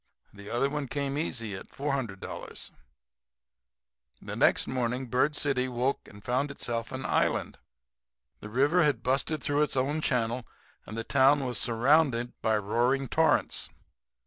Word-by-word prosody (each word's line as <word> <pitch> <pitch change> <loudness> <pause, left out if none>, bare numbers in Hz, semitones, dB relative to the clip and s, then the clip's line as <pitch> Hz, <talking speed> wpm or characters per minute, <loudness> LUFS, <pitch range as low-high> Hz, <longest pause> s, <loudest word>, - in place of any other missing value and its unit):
The 100 0 -10
other 120 +3 +1
one 145 -1 -3
came 140 +1 -2
easy 120 -8 -2
at 95 - -9
$400. 135 -8 -4 1.5
"The - - -7
next - - +3
morning 125 0 -1
Bird 130 +5 +1
City 135 -4 +1
woke 125 +2 -1
up - - -13
and 105 0 -14
found 130 +4 0
itself 115 -4 -3
an 130 0 -5
island. - - 0 0.8
The 105 - -9
river 145 +10 +3
had 145 -7 +2
busted 135 +4 0
through 145 0 +1
its 150 - +1
old 140 +4 0
channel, 125 -3 0 0.4
and 110 - -7
the 115 - -2
town 135 +3 +4
was 125 -4 -1
surrounded 120 +1 +2
by 110 -1 +2
roaring 120 +6 +1
torrents. 160 0 +2
130 Hz, 145 wpm, -29 LUFS, 115-140 Hz, 1.5 s, town